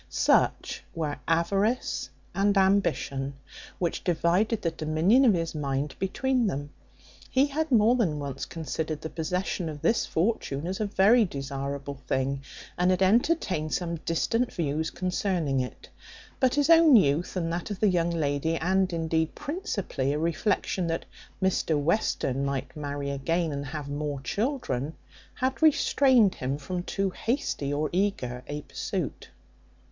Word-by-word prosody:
Such - - +1
were 155 -3 -2
avarice 195 +9 +1 0.2
and 200 +1 +2
ambition, 190 -8 +1 0.4
which 170 -2 -2
divided 180 +6 +1
the 165 - +1
dominion 160 - +3
of 220 -6 +5
his 165 -1 -2
mind 140 -1 -2
between 250 +5 +1
them. 145 -4 -3 0.6
He 265 +2 +4
had 305 +2 -2
more 225 0 +5
than 195 -12 +1
once 140 -2 -5
considered 160 -1 -4
the 160 - -6
possession 180 +1 -2
of 150 -2 -8
this 230 0 +2
fortune 165 -6 -1
as 185 +2 -3
a 215 - 0
very 210 +4 +5
desirable 140 -3 -4
thing, 135 +1 0 0.4
and 180 +1 +3
had 185 0 +3
entertained 190 - +2
some 170 -2 -2
distant 230 +10 0
views 160 -1 -1
concerning 180 -6 -1
it; 125 -1 -5 0.5
but 260 -2 +3
his 290 +2 +3
own 325 -4 +8
youth, 160 -3 +3
and 165 -2 -1
that 175 +3 -3
of 205 -2 -4
the 215 - +4
young 175 -3 +2
lady, 160 -1 0
and 185 +3 +1
indeed 160 -1 -1
principally 275 - -2
a - - -1
reflection 170 +2 0
that 165 0 -2 0.4
Mr 165 -5 +1
Western 145 - 0
might 140 -1 -3
marry 145 -1 -4
again, 165 +4 0
and 140 0 -4
have 145 0 -5
more 145 0 -3
children, 200 - -2 0.4
had 260 +3 -1
restrained 265 -8 +4
him 130 +2 -3
from 175 +5 -4
too 195 +2 -2
hasty 230 - -2
or 150 +2 0
eager 175 -11 -1
a 145 0 -5
pursuit. - - -4
170 Hz, 145 wpm, -27 LUFS, 145-205 Hz, 0.6 s, own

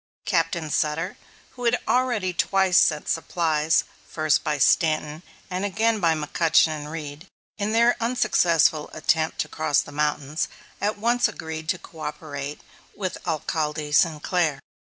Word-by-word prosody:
Captain 160 -3 0
Sutter, 160 +6 -1 0.4
who 245 -1 -7
had 235 +1 +3
already 240 -8 +1
twice 190 0 +3
sent 150 -2 +2
supplies, 160 -2 +1 0.2
first 155 -1 +1
by 150 - -1
Stanton 155 +2 +2 0.3
and 185 0 -3
again 220 +3 +1
by 165 -4 +3
McCutchen 160 +1 +3
and 150 -1 -5
Reed, 155 +1 -7 0.3
in 205 +1 -1
their 235 +2 +4
unsuccessful 170 -10 +2
attempt 160 0 0
to - - -3
cross 150 -2 +1
the - - -11
mountains, 150 0 -1 0.3
at 210 +1 0
once 240 +3 +2
agreed 160 0 -7
to 185 - +1
coöperate 150 -3 -7 0.3
with 190 -3 -4
Alcalde 155 -1 -2
Sinclair. 155 -1 +2
160 Hz, 135 wpm, -24 LUFS, 150-190 Hz, 0.4 s, their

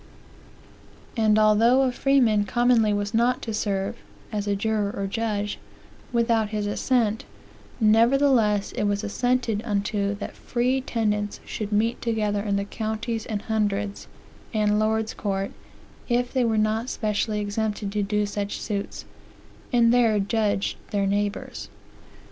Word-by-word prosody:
"And 215 -2 +3
although 225 +5 +5
a 260 - +2
freeman 245 -6 +3
commonly 240 -2 +3
was 205 +1 -1
not 240 +3 +2
to 225 - -4
serve 195 -2 -2 0.3
(as 205 -1 -3
a 200 - +1
juror 210 0 0
or 200 -1 -3
judge) 210 0 -2 0.5
without 230 -2 +2
his 210 -1 -2
assent, 225 +1 0 0.6
nevertheless 225 -1 +3
it - - -2
was 205 +1 0
assented 245 0 0
unto 205 -1 -1
that 200 - -7
free 250 +2 0
tenants 210 -4 -1
should 210 -1 -5
meet 225 +3 +1
together 210 -3 0
in 200 -1 -1
the 200 0 -1
counties 220 +1 -3
and 210 -2 -3
hundreds, 205 -2 -1 0.5
and 210 -1 +2
lords 220 +1 0
courts, 195 -1 -3 0.6
if 245 0 0
they 260 -2 +2
were 225 -1 +1
not 215 +3 +1
specially 210 0 -1
exempted 205 0 -2
to 210 0 -1
do 210 +1 0
such 205 0 -4
suits, 205 -2 -4 0.7
and 235 -2 +4
there 230 -3 +4
judged 205 -1 0
their 200 -1 0
neighbors." 205 +1 -2
215 Hz, 135 wpm, -25 LUFS, 205-230 Hz, 0.7 s, although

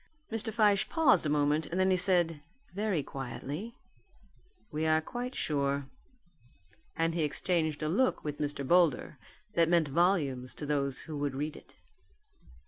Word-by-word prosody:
Mr. 225 0 -2
Fyshe 210 -3 +3
paused 275 - +4
a - - -1
moment 150 +1 +1
and 175 - -3
then 190 0 +3
he - - +4
said 175 -4 +2 0.3
very 200 -6 -1
quietly, 140 - -6 1.0
"We 155 +1 -1
are 155 0 +4
quite 245 +10 -5
sure," 140 -2 0 1.1
and 165 0 0
he 170 - -1
exchanged 155 0 0
a - - 0
look 235 +11 +1
with 150 -1 -4
Mr. 145 -2 -3
Boulder 170 -4 +2 0.3
that 165 -1 +3
meant 170 -4 +3
volumes 140 -6 +1
to 150 - -6
those 140 -2 -1
who 155 -3 -6
would 145 -2 -2
read 150 +2 -3
it. - - -15
160 Hz, 150 wpm, -31 LUFS, 145-185 Hz, 1.1 s, paused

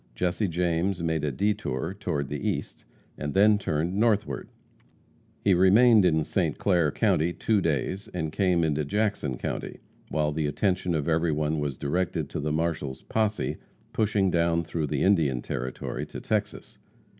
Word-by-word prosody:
Jesse 90 - 0
James 85 +1 0
made 80 -2 0
a 75 - 0
detour 95 -3 -1
toward 90 -8 -3
the - - -2
east, - - -5 0.3
and 75 0 -4
then 105 +1 +5
turned 80 -1 -1
northward. 105 -1 0 0.9
He 100 - +4
remained 105 +4 +6
in 80 -3 +3
St. - - -1
Clair 85 -7 +2
county 85 -5 +1
two 105 +4 +1
days, 85 +5 -1
and 80 -3 -3
came 90 -2 +2
into 75 -1 0
Jackson 85 - -1
county - - -4 0.3
while 75 -1 0
the 75 0 -1
attention 90 +3 0
of 75 -1 -1
everyone 80 -2 +1
was 70 -3 -3
directed 90 +5 -1
to - - -3
the 75 +1 -2
marshal's 80 -4 -2
posse 110 -1 -1 0.4
pushing 100 -3 +1
down 85 0 +2
through 80 -1 -3
the 75 -2 -1
Indian 80 -10 +3
Territory 65 +1 -4
to - - -7
Texas. - - -3
85 Hz, 155 wpm, -27 LUFS, 75-100 Hz, 0.9 s, remained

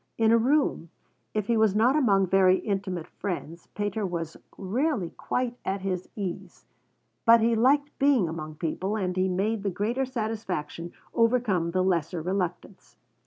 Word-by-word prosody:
In 225 -1 +4
a 230 - +6
room, 260 - +1 0.5
if 215 -2 0
he 235 - +1
was 220 -3 +3
not 240 +6 +4
among 200 -10 +3
very 185 0 +4
intimate 190 -5 -3
friends, 170 -3 -6
Pater 205 +1 -2
was 170 -4 -3 0.2
rarely 215 - -1
quite 250 -1 -2
at 195 0 -2
his 185 -2 -3
ease, 190 -5 -6 0.6
but 230 0 +7
he 230 +1 +2
liked 280 +6 +2
being 275 -9 +4
among 155 -1 -6
people, 180 +6 -2
and 185 -4 -2
he 185 0 +2
made 200 +4 0
the 200 - -1
greater 225 +8 -1
satisfaction 215 - -4 0.2
overcome 230 -8 +2
the 185 +2 +1
lesser 175 -2 0
reluctance. 180 +2 -4
195 Hz, 155 wpm, -27 LUFS, 180-230 Hz, 0.6 s, but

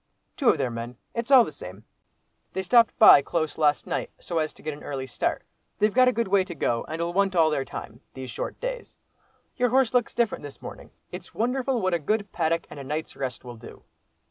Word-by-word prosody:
"Two 270 - +3
of - - +4
their 130 -3 -1
men—it's 120 - -6
all 260 -4 +8
the - - -7
same. 95 -5 -10 0.7
They 190 - -2
stopped 230 +4 +4 0.3
close 160 -1 -1
by - - -8
last 150 -1 +3
night - - -3
so 170 -2 -3
as 155 -1 -1
to - - -16
get 155 - -3
an 145 - -12
early 135 -2 -4
start. 130 - -2 0.3
They've 210 +1 +1
a 255 0 +6
good 235 -2 -1
way 190 0 +3
to 175 -2 -8
go, 120 -5 0
and'll 170 +2 -3
want 195 0 +1
all 160 -2 +4
their 140 -3 0
time, 120 -1 -9
these 130 -2 -7
short - - -5
days. - - -6 0.6
Your 245 -1 +2
horse 255 -1 +2
looks 245 -2 +1
different 235 -2 0
this 145 -1 -10
morning. - - -10 0.2
It's - - -9
wonderful 250 +2 0
what 185 -1 +1
a 170 - +1
good 205 +5 -1
paddock 165 0 0
and - - -9
a - - -6
night's 150 +3 -4
rest 135 -2 -5
will 120 -1 -9
do!" - - -13
170 Hz, 220 wpm, -26 LUFS, 140-230 Hz, 0.7 s, all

